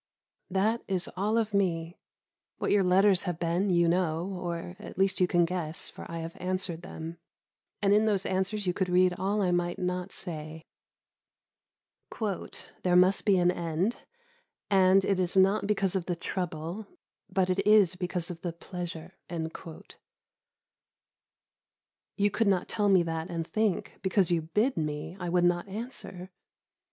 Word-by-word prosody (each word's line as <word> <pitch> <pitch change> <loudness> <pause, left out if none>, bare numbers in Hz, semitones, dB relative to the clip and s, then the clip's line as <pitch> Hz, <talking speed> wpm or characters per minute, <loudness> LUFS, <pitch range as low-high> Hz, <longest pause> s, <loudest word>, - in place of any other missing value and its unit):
That 210 +5 +1
is 185 -2 0
all 210 +4 +1
of 220 -2 0
me. 175 -3 0 0.6
What - - -1
your 205 -1 +4
letters 190 +1 +4
have 175 - -3
been 175 +4 0
you 170 -2 +4
know, 175 +1 0
or 175 0 -4
at - - -10
least 190 0 +2
you 180 - +5
can 175 -1 +3
guess, 165 -2 -3
for - - -10
I 170 - -5
have 165 +1 -7
answered 180 -2 -2
them, 165 -1 -8 0.6
and 200 0 +4
in 210 +1 +4
those 205 -3 +1
answers 190 +2 -1
you 180 - +1
could 185 0 -1
read 180 0 +4
all 195 +3 0
I 180 - +2
might 175 0 0
not 180 +1 -2
say. 155 -2 -7 2.2
"There 180 -1 +2
must 185 +2 +4
be 200 -3 +4
an 180 0 +4
end, 170 +6 -1 0.7
and 190 0 +5
it 195 -2 +1
is 180 +1 0
not 195 +2 +4
because 195 -2 +1
of 180 -3 -2
the 175 - 0
trouble, 175 +3 -4 0.4
but 185 -1 +1
it 185 - 0
is 210 -4 +6
because 180 -1 -3
of 170 -1 -9
the 175 -2 -3
pleasure." 175 0 -7 3.0
You 205 0 +2
could 225 +1 +1
not 190 -2 +2
tell 205 -1 +1
me 185 -3 +5
that 165 +1 -3
and 165 -2 -3
think, 215 +1 -1
because 190 -2 +2
you 170 -1 +2
bid 210 - 0
me, 150 +2 -3
I 175 -1 -3
would 175 0 +3
not 175 +2 +1
answer? 195 -4 -6
180 Hz, 160 wpm, -29 LUFS, 170-195 Hz, 3.0 s, is